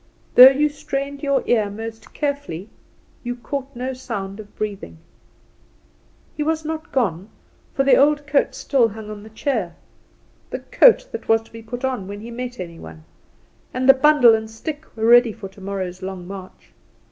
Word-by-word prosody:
Though 255 +1 +11
you 285 +3 +2
strained 280 -1 -5
your 280 -2 +1
ear 215 -4 +2
most 225 +2 -8
carefully 280 - -4 0.5
you 245 0 -4
caught 270 +3 -6
no 255 +2 -3
sound 200 -6 -6
of 210 -1 -12
breathing. 200 - -5 1.4
He 300 - -4
was 315 +1 -1
not 320 +1 -5
gone, 195 -6 -1 0.5
for 270 - +2
the 275 - +5
old 295 +1 +3
coat 295 -1 +1
still 265 -5 +2
hung 215 0 -9
on 210 -1 -8
the 215 - -12
chair 220 - -2 0.7
the - - -3
coat - - +4
that - - -7
was 225 0 +3
to - - -22
be 225 - -10
put 245 +3 -5
on 250 -8 -3
when 205 +1 -7
he 235 +2 -9
met 245 +1 -6
any 170 -2 -7
one; 80 -1 -11 0.7
and 255 +1 0
the 270 - +10
bundle 270 -4 +6
and 220 0 -1
stick 295 +7 -6
were 220 - -1
ready 240 -1 +6
for 195 - -8
tomorrow's 190 -2 -6
long 190 -1 -6
march. 190 -1 -11
235 Hz, 175 wpm, -21 LUFS, 200-275 Hz, 1.4 s, Though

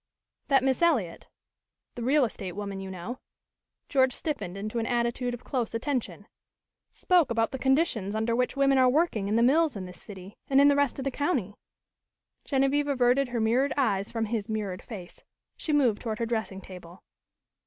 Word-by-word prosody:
"That 270 -2 +3
Miss 265 +2 +1
Eliot 245 - +1 0.7
the 240 - -7
real 270 +3 +3
estate 195 -5 -6
woman, 200 0 -5
you 190 0 -6
know 190 +7 -6 0.3
" - - -59
George 260 -2 +4
stiffened 245 - -4
into 215 +3 -3
an 230 - -2
attitude 240 0 -1
of 240 - -14
close 245 -5 -2
attention 255 +1 -3 0.7
"spoke 355 -6 +2
about 230 -1 0
the 265 - -5
conditions 265 - +1
under 220 +1 0
which 250 +3 -1
women 275 -1 +4
are 255 -1 +5
working 255 - +1
in 210 - 0
the 230 - +4
mills 305 +3 +3
in 190 -2 -5
this 180 0 -12
city 195 -1 -11
and 270 0 +5
in 285 +1 +7
the 285 - +4
rest 285 -2 +1
of 270 - -5
the 275 - 0
county 260 - -1 0.5
" - - -55
Genevieve 275 +1 +1
averted 260 0 +2
her 240 -1 -3
mirrored 240 +6 +2
eyes 205 -7 0
from 225 -1 -1
his 220 -1 -3
mirrored 205 -4 -3
face. 185 -6 -10 0.3
She 315 - -4
moved 255 -8 +2
toward 220 -3 -3
her 230 - -1
dressing 220 -4 -3
table. 180 -1 -12
240 Hz, 190 wpm, -27 LUFS, 210-275 Hz, 0.7 s, in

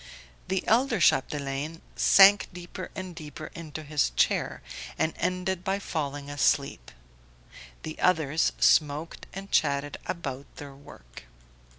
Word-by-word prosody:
The 190 0 -2
elder 235 -1 +3
Chapdelaine 145 +1 +1 0.2
sank 200 +1 +6
deeper 180 +1 -8
and 185 -1 -6
deeper 155 -1 -9
into 155 -2 -8
his 150 -1 +1
chair, - - +1 0.3
and 160 - 0
ended 185 0 -1
by 195 +1 0
falling 145 -7 -4
asleep; 140 - 0 0.9
the 155 - -7
others 160 -3 +2
smoked 150 +1 +2
and 195 +1 -9
chatted 145 -2 +1
about 140 -6 -5
their 145 -1 -9
work. - - -14
155 Hz, 115 wpm, -27 LUFS, 140-185 Hz, 0.9 s, sank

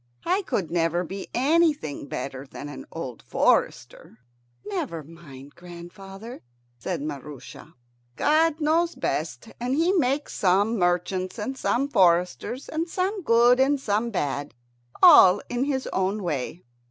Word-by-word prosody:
I 375 +3 +1
could 190 - -3
never 170 0 +1
be 195 +3 -7
anything 290 - +1
better 135 +1 -6
than 145 - -8
an 145 - -9
old 130 -8 -7
forester. - - 0 0.5
"Never 170 -6 -4
mind, 145 -3 -13
grandfather," 195 +6 -11 0.4
said 130 - -4
Maroosia. 145 +1 -9 0.4
God 315 +1 +2
knows 330 +3 +1
best, - - -3
and 250 +2 -1
He 335 +5 +2
makes 285 -4 0
some 200 +4 +2
merchants 180 +2 0
and 245 +5 -4
some 265 +1 0
foresters, 180 +4 +1
and 325 +2 -3
some 385 +4 -2
good 240 -3 +4
and 275 +2 +3
some 220 -1 -1
bad, 145 - -3 0.5
all 200 - +8
in 245 +2 -1
His 270 -2 -2
own 190 +2 -1
way. 160 +1 -4
195 Hz, 130 wpm, -25 LUFS, 165-275 Hz, 0.5 s, all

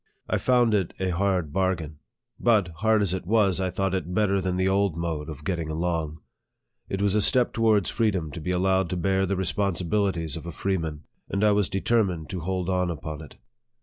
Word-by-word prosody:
I - - 0
found 120 -3 +3
it 95 -4 0
a 95 -1 0
hard 90 -4 0
bar 95 0 +2
gain. 75 -3 -9 0.4
But, 110 -7 +3
hard 110 +2 +3
as 95 -3 0
it 90 -2 -4
was, 100 -4 +3
I 95 -1 0
thought 95 +1 -1
it 90 -1 -2
better 100 -2 +2
than 90 0 -1
the 95 0 +2
old 95 -3 +1
mode 80 -2 -3
of 75 -2 -8
getting 85 -2 -2
along. 80 -1 -2 0.7
It 95 +1 -2
was 100 -2 +2
a 105 - +3
step 125 +3 +3
towards 110 -5 +2
freedom. 95 -9 0
to 85 - -7
be 90 - -4
allowed 95 0 +2
to 90 - -2
bear 95 +2 +1
the 100 - 0
responsibilities 95 -3 0
of 85 +1 -7
a - - -4
freeman, 80 -5 -2 0.3
and 100 +1 -1
I 105 - +5
was 105 -1 +2
determined 95 -5 0
to 95 - -3
hold 90 +1 -2
on 90 -1 +1
upon 80 -2 -5
it. 80 - -12
95 Hz, 210 wpm, -26 LUFS, 85-100 Hz, 0.7 s, I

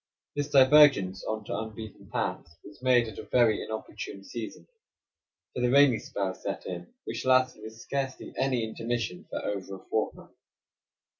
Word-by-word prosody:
This 145 0 -1
divergence 135 -9 +6
on 110 -1 -3
to - - -4
unbeaten 110 -1 -7
paths 85 0 -3
was 105 - -14
made 125 -2 +4
at 110 - -8
a - - -9
very 120 -4 +4
inopportune 110 -2 -6
season; 115 +2 -7 0.9
for - - -3
the 125 - +3
rainy 135 -3 +6
spell 95 -2 -3
set - - -5
in, 90 -1 -6
which - - -4
lasted, 130 -3 +3
with 110 +1 -9
scarcely 135 +3 -4
any 130 -3 +1
intermission, 115 -3 -3
for - - -4
over 100 -1 -3
a - - -11
fortnight. 110 - -2
115 Hz, 155 wpm, -28 LUFS, 105-130 Hz, 0.9 s, divergence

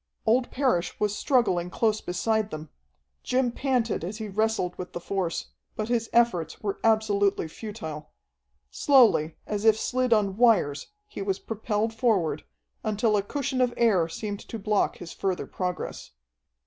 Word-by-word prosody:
Old 245 +3 +3
Parrish 250 -11 0
was 210 -1 0
struggling 195 -10 +1
close 215 +4 +1
beside 215 +4 0
them. 155 -4 -7 0.5
Jim 250 -1 +1
panted 245 - 0
as 195 +5 -4
he 220 -1 -5
wrestled 210 -3 0
with 180 - -7
the - - -4
force, 180 -1 -3 0.2
but 215 +1 -3
his 230 -2 0
efforts 180 -9 +2
were 200 -2 -3
absolutely 205 -5 +2
futile. 160 -5 -7 0.6
Slowly, 230 - +4
as 210 -1 -3
if 220 -1 +5
slid 255 +1 0
on 205 -3 +2
wires, 210 -12 +3 0.2
he 310 - -7
was 195 -1 -1
propelled 220 0 -2
forward, 220 -9 +1 0.4
until 215 +1 +1
a 205 - +3
cushion 265 +4 -2
of 245 -1 +1
air 195 -8 +3
seemed 205 +4 -5
to 230 - -7
block 210 -1 0
his 175 - -8
further 190 -2 -2
progress. 180 -1 -4
210 Hz, 150 wpm, -26 LUFS, 185-230 Hz, 0.6 s, if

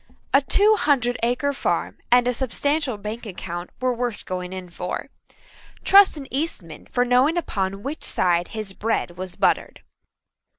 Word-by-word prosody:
A 275 - +6
two 415 +9 +4
hundred 250 -4 +1
acre 250 +5 0
farm - - -2
and 245 0 +5
a 250 - +2
substantial 270 +1 -1
bank 215 +3 -6
account 175 -2 -6
were 255 0 +1
worth 240 -2 -3
going 180 -1 -4
in 185 -2 -7
for. 180 +1 -5 0.7
Trust 395 -4 +6
an 280 - -7
Eastman 260 - -4
for 245 0 +1
knowing 255 +7 +3
upon 195 - -2
which 295 +3 -5
side 175 -1 +2
his 215 -3 -6
bread 215 -4 -2
was 185 0 -7
buttered. - - 0
240 Hz, 155 wpm, -23 LUFS, 190-275 Hz, 0.7 s, A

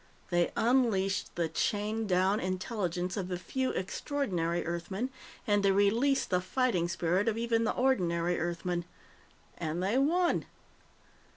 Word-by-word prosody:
They 175 0 +3
unleashed 220 -6 +1
the 170 -1 0
chained 210 +6 -1
down 190 +3 +3
intelligence 185 -1 -2
of 190 -3 -2
the 180 -1 -3
few 260 +8 -2
extraordinary 185 - -2
Earthmen, 190 +9 -3 0.3
and 205 -3 +3
they 195 -1 +4
released 225 +8 +2
the 180 0 +3
fighting 185 -3 +1
spirit 175 +3 0
of 225 -1 +1
even 230 0 +1
the - - +1
ordinary 175 -9 +1
Earthmen. 175 +1 -2 0.7
And 170 +2 -2
they 210 +7 +2
won!" 340 +5 +2
190 Hz, 130 wpm, -31 LUFS, 175-230 Hz, 0.7 s, they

